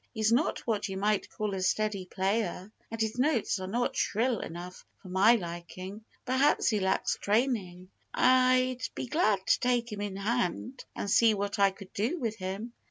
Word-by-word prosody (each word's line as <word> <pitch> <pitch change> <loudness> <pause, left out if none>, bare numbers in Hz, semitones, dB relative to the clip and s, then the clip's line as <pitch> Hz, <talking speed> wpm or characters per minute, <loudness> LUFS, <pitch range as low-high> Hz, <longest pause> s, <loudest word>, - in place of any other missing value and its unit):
He's 220 0 +1
not 245 +7 +1
what 215 -3 -1
you 190 - -4
might 205 +1 0
call 210 -2 -3
a 190 - -3
steady 200 0 0
player. 195 0 -2 0.2
And 225 - -6
his 220 +2 -1
notes 255 -7 +1
are 185 - -5
not 240 +5 -1
shrill 230 +2 +1
enough 175 +2 -8
for 185 - -13
my 195 +6 +5
liking. 185 +2 -7 0.2
Perhaps 260 +3 +3
he 215 -2 +1
lacks 190 0 0
training. 200 -5 0 0.2
I'd 255 0 +3
be - - -3
glad 215 - +1
to - - +3
take 245 -2 0
him 205 -1 -5
in 205 -2 -4
hand 235 +4 -2
and - - -4
see 220 +2 +4
what 205 +1 -3
I 200 0 +6
could 195 0 -13
do 235 - -1
with 225 -7 -3
him. 195 +5 -5
215 Hz, 180 wpm, -29 LUFS, 190-240 Hz, 0.2 s, I